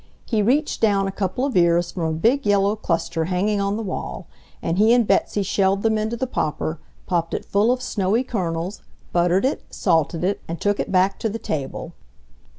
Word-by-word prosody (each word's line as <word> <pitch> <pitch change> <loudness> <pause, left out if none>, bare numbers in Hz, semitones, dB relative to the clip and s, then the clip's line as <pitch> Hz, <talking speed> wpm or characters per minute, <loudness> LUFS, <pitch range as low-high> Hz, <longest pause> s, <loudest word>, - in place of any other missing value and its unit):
He 220 -3 +1
reached 275 +9 +1
down 200 -3 +3
a - - -2
couple 195 +6 -2
of 280 - -3
ears 170 -1 +3
from 175 - -4
a 160 - 0
big 245 - +2
yellow 205 0 +2
cluster 165 -4 -1
hanging 200 +4 0
on 200 +1 0
the 225 - -3
wall, 195 - -5 0.3
and 165 +3 -1
he 220 +3 +6
and 240 -2 +3
Betsy 200 +1 +1
shelled 195 +1 +1
them 220 -1 +2
into 220 +2 -1
the 260 - -1
popper, 155 - -2 0.3
popped 170 -2 -1
it - - -4
full 205 +4 +2
of 255 0 -1
snowy 210 +3 0
kernels, 180 -5 -3 0.3
buttered 175 +4 +3
it, 270 - 0
salted 165 -2 0
it, 195 +2 0
and 165 +1 -5
took 205 0 0
it - - -2
back 190 +1 +2
to 225 - -1
the 220 - -4
table. 140 -10 -4
195 Hz, 200 wpm, -22 LUFS, 175-220 Hz, 0.3 s, he